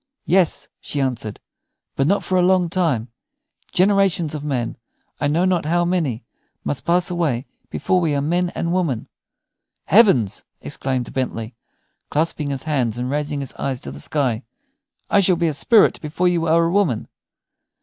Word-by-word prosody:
"Yes," 180 Hz, -2 st, +2 dB
she 145 Hz, -, -4 dB
answered; 120 Hz, -6 st, -2 dB, 0.6 s
"but 135 Hz, -, +1 dB
not 200 Hz, +4 st, +2 dB
for 185 Hz, -, -1 dB
a 180 Hz, -, +4 dB
long 180 Hz, -1 st, +3 dB
time. 155 Hz, -10 st, 0 dB, 0.6 s
Generations 190 Hz, -4 st, +3 dB
of 150 Hz, -2 st, -5 dB
men 130 Hz, -6 st, -2 dB, 0.4 s
I 145 Hz, -, +1 dB
know 165 Hz, +5 st, +2 dB
not 180 Hz, -4 st, +1 dB
how 175 Hz, +2 st, +2 dB
many 160 Hz, -11 st, -1 dB, 0.4 s
must 145 Hz, -, -1 dB
pass 175 Hz, +1 st, +2 dB
away 150 Hz, -8 st, -1 dB, 0.2 s
before 185 Hz, -1 st, 0 dB
we 155 Hz, -4 st, +1 dB
are -, -, +1 dB
men 175 Hz, +4 st, 0 dB
and 170 Hz, 0 st, -1 dB
women." 160 Hz, -11 st, -1 dB, 0.8 s
"Heavens!" 190 Hz, -, +4 dB, 0.2 s
exclaimed 130 Hz, -2 st, -3 dB
Bentley, 120 Hz, -3 st, -3 dB, 0.6 s
clasping 150 Hz, -1 st, 0 dB
his 135 Hz, -2 st, -4 dB
hands 130 Hz, -8 st, 0 dB
and 125 Hz, +1 st, -3 dB
raising 145 Hz, 0 st, -2 dB
his 135 Hz, -, -5 dB
eyes 135 Hz, -2 st, -2 dB
to 70 Hz, -, -6 dB
the 70 Hz, -, -9 dB
sky, 125 Hz, -, 0 dB, 0.6 s
"I 205 Hz, -, +3 dB
shall 185 Hz, -2 st, +4 dB
be 170 Hz, 0 st, 0 dB
a 155 Hz, -, 0 dB
spirit 215 Hz, -, +4 dB
before 165 Hz, +4 st, 0 dB
you 170 Hz, -2 st, +1 dB
are 165 Hz, +1 st, +4 dB
a 165 Hz, -, 0 dB
woman." 180 Hz, -, +1 dB
155 Hz, 165 wpm, -21 LUFS, 130-180 Hz, 0.8 s, a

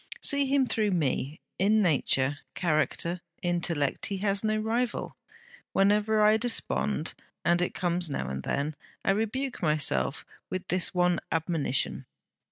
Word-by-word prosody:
See 280 Hz, -1 st, +3 dB
him 275 Hz, 0 st, +3 dB
through 220 Hz, -3 st, 0 dB
me. 150 Hz, -3 st, -1 dB, 0.2 s
In 210 Hz, +3 st, +4 dB
nature, 145 Hz, -4 st, +2 dB, 0.2 s
character, 170 Hz, +1 st, 0 dB, 0.2 s
intellect, 170 Hz, -5 st, 0 dB
he 200 Hz, -, -3 dB
has 200 Hz, +1 st, 0 dB
no 215 Hz, 0 st, +1 dB
rival. 230 Hz, +3 st, -1 dB, 0.6 s
Whenever 210 Hz, +2 st, +3 dB
I 215 Hz, +1 st, +5 dB
despond 215 Hz, -6 st, +1 dB, 0.3 s
and 175 Hz, +1 st, +3 dB
it 180 Hz, -, -1 dB
comes 175 Hz, -2 st, 0 dB
now 65 Hz, -, -3 dB
and 65 Hz, +1 st, -4 dB
then 145 Hz, -, -2 dB, 0.3 s
I -, -, +4 dB
rebuke 235 Hz, +6 st, -2 dB
myself 145 Hz, -, 0 dB, 0.2 s
with 185 Hz, 0 st, -4 dB
this 180 Hz, -1 st, +2 dB
one 180 Hz, -1 st, +3 dB
admonition. 160 Hz, -5 st, -1 dB
180 Hz, 135 wpm, -28 LUFS, 155-215 Hz, 0.6 s, I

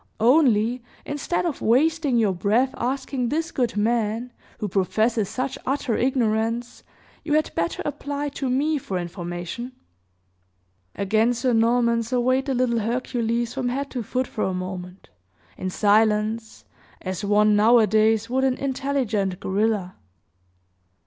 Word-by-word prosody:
"Only, 240 Hz, -2 st, +3 dB, 0.2 s
instead 290 Hz, +5 st, -2 dB
of 330 Hz, -5 st, -3 dB
wasting 285 Hz, +2 st, +2 dB
your 215 Hz, -4 st, +2 dB
breath 220 Hz, +8 st, +1 dB
asking 260 Hz, 0 st, -2 dB
this 325 Hz, +4 st, -1 dB
good 240 Hz, -5 st, -1 dB
man, 230 Hz, +2 st, 0 dB, 0.2 s
who 210 Hz, -, -3 dB
professes 210 Hz, +3 st, +1 dB
such 260 Hz, +1 st, -3 dB
utter 270 Hz, -3 st, -1 dB
ignorance, 235 Hz, -1 st, 0 dB, 0.4 s
you 295 Hz, -, -2 dB
had 310 Hz, -, +1 dB
better 170 Hz, 0 st, -2 dB
apply 285 Hz, 0 st, -3 dB
to 275 Hz, -2 st, -4 dB
me 290 Hz, +4 st, +1 dB
for 195 Hz, -7 st, -4 dB
information." 175 Hz, +7 st, -5 dB, 1.2 s
Again 220 Hz, +4 st, +2 dB
Sir 250 Hz, +1 st, 0 dB
Norman 235 Hz, +1 st, +3 dB
surveyed 255 Hz, +3 st, 0 dB
the 270 Hz, -, 0 dB
little 240 Hz, -2 st, +1 dB
Hercules 235 Hz, 0 st, -1 dB
from 260 Hz, -2 st, -1 dB
head 275 Hz, +3 st, -3 dB
to 250 Hz, -, -3 dB
foot 255 Hz, +4 st, -2 dB
for 220 Hz, -, -4 dB
a 190 Hz, -, -1 dB
moment, 185 Hz, 0 st, -7 dB, 0.5 s
in 185 Hz, -, -4 dB
silence, 215 Hz, +2 st, +1 dB, 0.4 s
as 185 Hz, 0 st, -4 dB
one, 210 Hz, +1 st, +4 dB
nowadays, 220 Hz, 0 st, +4 dB
would 260 Hz, +2 st, 0 dB
an 265 Hz, -1 st, +2 dB
intelligent 260 Hz, -9 st, -1 dB
gorilla. 200 Hz, -1 st, -1 dB
235 Hz, 130 wpm, -24 LUFS, 210-260 Hz, 1.2 s, one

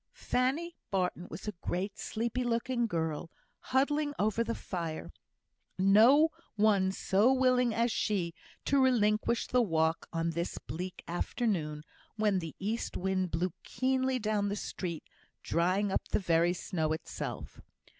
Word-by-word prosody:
Fanny 295 Hz, +7 st, 0 dB
Barton 180 Hz, -2 st, -1 dB
was 195 Hz, -, -8 dB
a -, -, 0 dB
great 195 Hz, +3 st, -3 dB
sleepy 235 Hz, +3 st, -2 dB
looking 240 Hz, 0 st, 0 dB
girl, 160 Hz, -3 st, -2 dB, 0.3 s
huddling 290 Hz, +2 st, +1 dB
over 215 Hz, +2 st, +1 dB
the 230 Hz, 0 st, -2 dB
fire. 165 Hz, -4 st, -5 dB, 0.7 s
No 225 Hz, +11 st, +6 dB, 0.3 s
one 205 Hz, -3 st, +3 dB
so 200 Hz, +5 st, +3 dB
willing 255 Hz, -2 st, +3 dB
as 230 Hz, +2 st, +1 dB
she 180 Hz, -7 st, 0 dB, 0.3 s
to 280 Hz, 0 st, +3 dB
relinquish 230 Hz, -2 st, +2 dB
the 250 Hz, -, +2 dB
walk 165 Hz, -5 st, +1 dB
on 165 Hz, 0 st, -1 dB
this 170 Hz, +1 st, -3 dB
bleak 175 Hz, +7 st, -6 dB
afternoon, 170 Hz, -4 st, -1 dB, 0.3 s
when 210 Hz, -3 st, +2 dB
the 165 Hz, -3 st, -7 dB
east 215 Hz, +4 st, -3 dB
wind 185 Hz, -1 st, 0 dB
blew 170 Hz, +2 st, -1 dB
keenly 260 Hz, 0 st, 0 dB
down 210 Hz, -3 st, 0 dB
the 200 Hz, -, -1 dB
street, 175 Hz, -5 st, -4 dB, 0.4 s
drying 185 Hz, +4 st, +1 dB
up -, -, -1 dB
the -, -, +1 dB
very 170 Hz, -2 st, +2 dB
snow 160 Hz, -3 st, -1 dB
itself. 160 Hz, -, -6 dB
205 Hz, 135 wpm, -31 LUFS, 175-240 Hz, 0.7 s, No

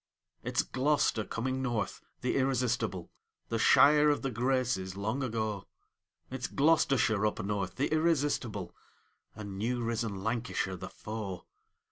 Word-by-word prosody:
It's -, -, 0 dB
Glo'ster 130 Hz, -4 st, +1 dB
coming 130 Hz, +3 st, -2 dB
North, 120 Hz, -6 st, -2 dB, 0.2 s
the 125 Hz, -, 0 dB
irresistible, 125 Hz, -8 st, 0 dB, 0.4 s
The 115 Hz, -, -1 dB
Shire 150 Hz, +5 st, +6 dB
of 145 Hz, -, +1 dB
the 135 Hz, -, -1 dB
Graces, 120 Hz, -6 st, 0 dB
long 110 Hz, +7 st, -2 dB
ago! 110 Hz, -5 st, -2 dB, 0.6 s
It's 130 Hz, -1 st, -3 dB
Gloucestershire 135 Hz, -8 st, +3 dB
up 105 Hz, -, 0 dB
North, 100 Hz, -3 st, -2 dB
the -, -, 0 dB
irrestistable, 145 Hz, -, 0 dB, 0.6 s
And 100 Hz, -2 st, -7 dB
new 120 Hz, +3 st, -1 dB
risen 115 Hz, -4 st, -2 dB
Lancashire 110 Hz, -4 st, -1 dB
the 95 Hz, +1 st, -7 dB
foe! 105 Hz, -4 st, -6 dB
115 Hz, 125 wpm, -31 LUFS, 105-130 Hz, 0.6 s, Shire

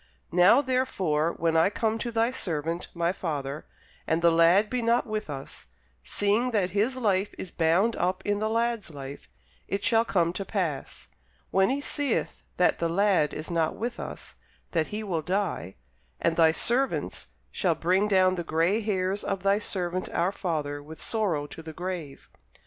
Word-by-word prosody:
Now, 180 Hz, +9 st, +6 dB
therefore, 185 Hz, -, 0 dB
when 165 Hz, 0 st, 0 dB
I 165 Hz, +4 st, +5 dB
come 220 Hz, +1 st, -1 dB
to 235 Hz, -, -3 dB
thy 230 Hz, +1 st, +2 dB
servant 165 Hz, -, -3 dB
my 170 Hz, 0 st, +1 dB
father, 145 Hz, -5 st, -4 dB, 0.4 s
and 165 Hz, +1 st, +1 dB
the 170 Hz, -, +6 dB
lad 170 Hz, +5 st, +5 dB
be 250 Hz, +2 st, -2 dB
not 235 Hz, +1 st, +2 dB
with 215 Hz, -6 st, -4 dB
us; 135 Hz, -1 st, -8 dB, 0.3 s
seeing 205 Hz, -, +1 dB
that 200 Hz, -6 st, 0 dB
his 215 Hz, +7 st, +1 dB
life 205 Hz, -5 st, 0 dB
is 185 Hz, -, -7 dB
bound 175 Hz, +7 st, +2 dB
up 185 Hz, +1 st, -1 dB
in 205 Hz, 0 st, +1 dB
the 215 Hz, +1 st, 0 dB
lad's 230 Hz, -2 st, 0 dB
life; 140 Hz, -, -9 dB, 0.4 s
it 200 Hz, 0 st, -2 dB
shall 230 Hz, -1 st, +4 dB
come 175 Hz, -7 st, +1 dB
to 195 Hz, -, -3 dB
pass, 175 Hz, -9 st, -3 dB, 0.4 s
when 190 Hz, 0 st, +3 dB
he 275 Hz, +2 st, 0 dB
seeth 285 Hz, -3 st, -1 dB, 0.2 s
that 180 Hz, -, +3 dB
the 170 Hz, -, 0 dB
lad 185 Hz, -4 st, +3 dB
is 155 Hz, +3 st, -5 dB
not 165 Hz, -2 st, +1 dB
with 240 Hz, +2 st, -4 dB
us, -, -, -8 dB, 0.3 s
that 160 Hz, -3 st, +1 dB
he 215 Hz, +1 st, -4 dB
will 175 Hz, -6 st, -1 dB
die: 185 Hz, -, -2 dB, 0.4 s
and 165 Hz, -, +1 dB
thy 160 Hz, -1 st, +5 dB
servants 250 Hz, +10 st, 0 dB, 0.2 s
shall 175 Hz, -5 st, +1 dB
bring 185 Hz, +6 st, +2 dB
down 185 Hz, -2 st, +4 dB
the 175 Hz, -, -2 dB
gray 170 Hz, +7 st, +1 dB
hairs 195 Hz, -2 st, -1 dB
of 195 Hz, -2 st, -3 dB
thy 200 Hz, +1 st, +3 dB
servant 185 Hz, -3 st, -2 dB
our 175 Hz, +3 st, +1 dB
father 150 Hz, -6 st, -3 dB
with 155 Hz, +2 st, -11 dB
sorrow 190 Hz, -10 st, -1 dB
to 145 Hz, -, -10 dB
the 160 Hz, 0 st, -9 dB
grave. 175 Hz, -5 st, -6 dB
185 Hz, 175 wpm, -27 LUFS, 165-215 Hz, 0.4 s, Now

